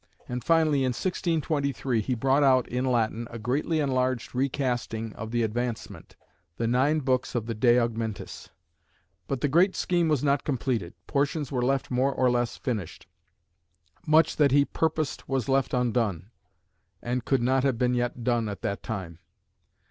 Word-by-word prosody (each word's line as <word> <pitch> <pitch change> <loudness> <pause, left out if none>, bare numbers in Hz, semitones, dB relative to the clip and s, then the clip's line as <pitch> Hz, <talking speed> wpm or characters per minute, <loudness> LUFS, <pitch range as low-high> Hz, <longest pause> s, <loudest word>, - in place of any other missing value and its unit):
And 125 -1 -4
finally, 160 -2 +3
in 130 -2 +1
1623, 145 - -1
he 125 +4 -1
brought 135 +4 +2
out 130 -3 +4
in 125 +2 -2
Latin 115 -2 0
a 115 - -7
greatly 140 +8 -1
enlarged 130 -3 0
recasting 125 -4 -2
of 110 +1 -7
the 120 0 0
Advancement; 120 +1 -4 0.4
the 115 - -1
nine 135 +6 +2
books 130 -1 0
of 115 -3 -1
the 115 - -3
"De 120 +2 +4
Augmentis." 115 -3 -3 0.8
But 135 -3 -3
the - - +2
great 175 +7 +3
scheme 175 -2 +1
was 150 -4 +1
not 140 -1 +2
completed; 120 - -2
portions 145 0 -1
were 125 -2 0
left 135 +2 0
more 130 +2 +2
or 130 -2 +2
less 120 -1 -1
finished. 105 -10 -4 1.0
Much 155 +2 +4
that 145 -3 +4
he 140 +1 +5
purposed 155 -2 -2
was 135 -4 -1
left 135 0 +1
undone, 115 - 0 0.7
and 125 0 -2
could 135 -2 +1
not 130 +1 +2
have 135 -4 +1
been 125 0 +1
yet 120 0 -2
done 120 -2 +1
at 100 - -7
that 100 - -2
time. 95 -7 -6
125 Hz, 165 wpm, -27 LUFS, 115-140 Hz, 1.0 s, he